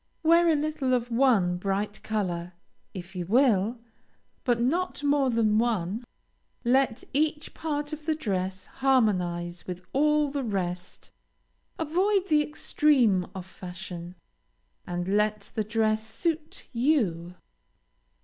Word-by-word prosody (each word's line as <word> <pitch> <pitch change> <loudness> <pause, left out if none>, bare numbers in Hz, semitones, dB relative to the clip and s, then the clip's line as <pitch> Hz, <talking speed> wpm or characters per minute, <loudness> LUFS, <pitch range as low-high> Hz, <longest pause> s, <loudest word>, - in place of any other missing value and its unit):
Wear 335 +2 +5
a 320 - +4
little 290 -3 0
of 245 0 -2
one 230 -8 +3
bright 200 +3 -2
color, 180 -5 -2 0.4
if 185 0 -9
you 175 -2 -4
will, 230 -1 +3 0.7
but 240 -2 +2
not 300 +6 0
more 285 -2 +3
than 220 -3 +2
one. 220 -2 0 0.6
Let 255 -1 +2
each 300 +1 0
part 295 -1 -3
of 305 0 -8
the 315 - +2
dress 190 -8 -3
harmonize 180 -10 0
with 180 0 -6
all 300 +1 +3
the 280 -1 -2
rest; 180 -4 -4 0.7
avoid 375 +5 +1
the 305 -1 +5
extreme 265 -10 +2
of 185 -2 -6
fashion, 180 -1 -8 0.7
and 175 0 -3
let 210 +1 0
the 215 - 0
dress 215 0 +1
suit 315 +6 -3
you. 215 - +1
225 Hz, 120 wpm, -27 LUFS, 185-290 Hz, 0.7 s, Wear